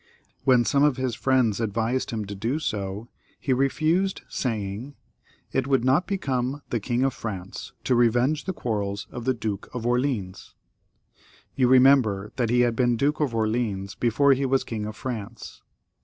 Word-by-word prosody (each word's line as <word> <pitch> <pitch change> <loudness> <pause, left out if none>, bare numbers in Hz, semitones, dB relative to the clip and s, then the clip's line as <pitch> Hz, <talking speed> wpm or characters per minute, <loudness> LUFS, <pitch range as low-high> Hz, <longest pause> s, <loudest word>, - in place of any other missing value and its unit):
When 125 -3 +5
some 140 - +2
of 145 -3 +3
his 130 -2 -1
friends 120 -4 +1
advised 115 +4 -1
him 110 -3 -3
to 100 - -6
do 115 +8 -2
so, 105 -6 -3 0.3
he 135 - 0
refused, 155 +8 +1
saying, 110 +3 -3 0.3
" - - -34
It 130 0 0
would 135 -3 +2
not 135 +7 +3
become 135 - -2
the 120 - +1
King 120 +4 -1
of 135 - +1
France 95 -4 -6
to - - +1
revenge 120 +5 +2
the 190 - -1
quarrels 100 - -3
of 120 -1 -7
the 130 -1 +2
Duke 110 -3 -4
of 120 -2 -4
Orleans." 120 -6 -1 1.0
You 130 -2 +3
remember 125 -6 +4
that 120 -3 +1
he 120 +1 +3
had 120 -1 +2
been 120 -1 +2
Duke 145 +5 +1
of 140 -6 0
Orleans 110 -3 -1
before 135 +4 +3
he 135 +1 -1
was 135 0 +2
King 105 -2 -4
of 110 - -7
France. 115 -2 -7
120 Hz, 170 wpm, -25 LUFS, 110-135 Hz, 1.0 s, When